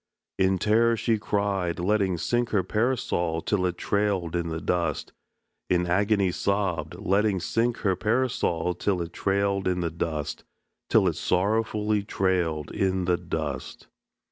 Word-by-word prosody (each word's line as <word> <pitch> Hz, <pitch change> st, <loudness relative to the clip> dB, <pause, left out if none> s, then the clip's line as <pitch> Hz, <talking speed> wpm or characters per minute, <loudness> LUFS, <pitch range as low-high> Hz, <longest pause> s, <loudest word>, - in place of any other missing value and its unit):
In 95 Hz, 0 st, +3 dB
terror 115 Hz, +3 st, +3 dB
she 110 Hz, -1 st, +1 dB
cried, 100 Hz, -5 st, -1 dB
letting 95 Hz, 0 st, +1 dB
sink 120 Hz, +8 st, 0 dB
her 100 Hz, -4 st, +1 dB
Parasol 100 Hz, -6 st, 0 dB
till 90 Hz, -1 st, 0 dB
it 90 Hz, -1 st, -4 dB
trailed 100 Hz, -5 st, 0 dB
in 85 Hz, -1 st, -1 dB
the 80 Hz, 0 st, -3 dB
dust; 90 Hz, +1 st, -1 dB, 0.6 s
In 90 Hz, -1 st, +2 dB
agony 100 Hz, +2 st, +2 dB
sobbed, 100 Hz, -2 st, -1 dB
letting 100 Hz, 0 st, +1 dB
sink 115 Hz, +7 st, 0 dB
her 95 Hz, -2 st, +3 dB
Parasol 105 Hz, -6 st, 0 dB
till 95 Hz, +1 st, -1 dB
it 85 Hz, -, -9 dB
trailed 100 Hz, 0 st, 0 dB
in 90 Hz, -1 st, 0 dB
the 85 Hz, -1 st, -1 dB
dust, 80 Hz, -3 st, -3 dB, 0.5 s
Till -, -, +4 dB
it -, -, 0 dB
sorrowfully 105 Hz, +2 st, +1 dB
trailed 90 Hz, -6 st, -1 dB
in 95 Hz, -1 st, 0 dB
the 90 Hz, 0 st, +3 dB
dust. -, -, -5 dB
95 Hz, 140 wpm, -26 LUFS, 90-105 Hz, 0.6 s, Till